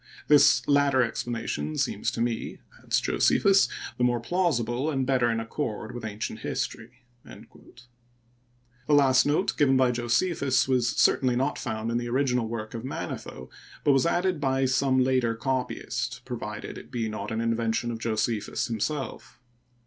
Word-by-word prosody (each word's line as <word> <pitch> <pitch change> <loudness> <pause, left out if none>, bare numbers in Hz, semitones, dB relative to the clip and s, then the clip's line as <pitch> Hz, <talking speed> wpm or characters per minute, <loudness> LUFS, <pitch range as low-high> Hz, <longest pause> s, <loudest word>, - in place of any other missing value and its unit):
This 140 -5 +5
latter 140 -2 +4
explanation 110 -11 -3
seems - - 0
to - - -4
me,'* 120 -1 -2 0.2
adds - - +1
Josephus, 195 0 +3
" - - -10
the - - +2
more 120 -1 +2
plausible 135 -3 0
and 135 -3 -1
better 125 -3 +2
in 115 -1 0
accord 115 -1 -4
with 120 - -7
ancient 110 0 -5
history." 120 +2 -5 0.2
The - - -12 1.4
last 135 -3 +4
note 155 +7 +1
given 135 -3 +4
by 130 -1 +3
Josephus 130 +3 +1
was 125 -3 +2
certainly 125 0 +3
not 135 +4 -1
found 110 -1 -3
in 120 - 0
the 120 0 -4
original 125 -2 +1
work 110 -1 -5
of 115 -1 -6
Manetho, 65 - -6 0.3
but 145 - +4
was 135 +4 +3
added 175 -2 0
by 135 -1 +1
some 130 0 +2
later 125 -3 +1
copyist, 130 +2 -3
provided - - -6
it - - -15
be 115 -2 -2
not 105 -1 -5
an 110 - -2
invention 115 +1 0
of 115 - -5
Josephus 110 -1 -1
himself. 120 +2 -4
125 Hz, 155 wpm, -26 LUFS, 115-135 Hz, 1.4 s, This